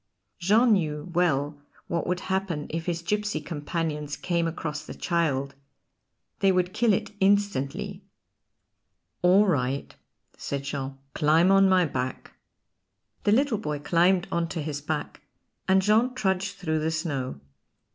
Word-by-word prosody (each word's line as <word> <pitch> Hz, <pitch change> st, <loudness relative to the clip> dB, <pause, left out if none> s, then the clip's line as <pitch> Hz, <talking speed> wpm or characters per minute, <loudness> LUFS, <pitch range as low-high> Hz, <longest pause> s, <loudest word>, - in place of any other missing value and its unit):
Jean 220 Hz, +6 st, +4 dB
knew 155 Hz, -3 st, -1 dB
well 145 Hz, -4 st, +1 dB, 0.2 s
what 170 Hz, -1 st, -2 dB
would 180 Hz, 0 st, -1 dB
happen 190 Hz, -6 st, -2 dB
if 165 Hz, +1 st, -4 dB
his 170 Hz, -1 st, -2 dB
gipsy 210 Hz, -2 st, -1 dB
companions 150 Hz, -1 st, -3 dB
came 170 Hz, -2 st, 0 dB
across 155 Hz, -2 st, -4 dB
the -, -, -9 dB
child. 140 Hz, -6 st, 0 dB, 0.9 s
They 195 Hz, -, +4 dB
would 180 Hz, -1 st, +1 dB
kill 235 Hz, -1 st, +3 dB
it 210 Hz, +2 st, 0 dB
instantly. 195 Hz, -1 st, 0 dB, 1.2 s
"All 185 Hz, +4 st, +5 dB
right," 140 Hz, -6 st, -1 dB, 0.4 s
said 140 Hz, -1 st, -4 dB
Jean, 140 Hz, -1 st, -4 dB, 0.2 s
"climb 160 Hz, +4 st, +4 dB
on 195 Hz, 0 st, +6 dB
my 185 Hz, -1 st, +4 dB
back." 130 Hz, -3 st, -4 dB, 0.9 s
The 205 Hz, -, +4 dB
little 245 Hz, -1 st, +2 dB
boy 150 Hz, -8 st, -3 dB
climbed 175 Hz, +5 st, +2 dB
on 170 Hz, 0 st, 0 dB
to 165 Hz, -, -3 dB
his 145 Hz, -1 st, -4 dB
back, 150 Hz, +1 st, -4 dB, 0.5 s
and 190 Hz, 0 st, +4 dB
Jean 225 Hz, +5 st, +3 dB
trudged 190 Hz, -3 st, 0 dB
through 160 Hz, -5 st, -1 dB
the 155 Hz, +1 st, 0 dB
snow. 145 Hz, -, -3 dB
170 Hz, 135 wpm, -26 LUFS, 150-195 Hz, 1.2 s, on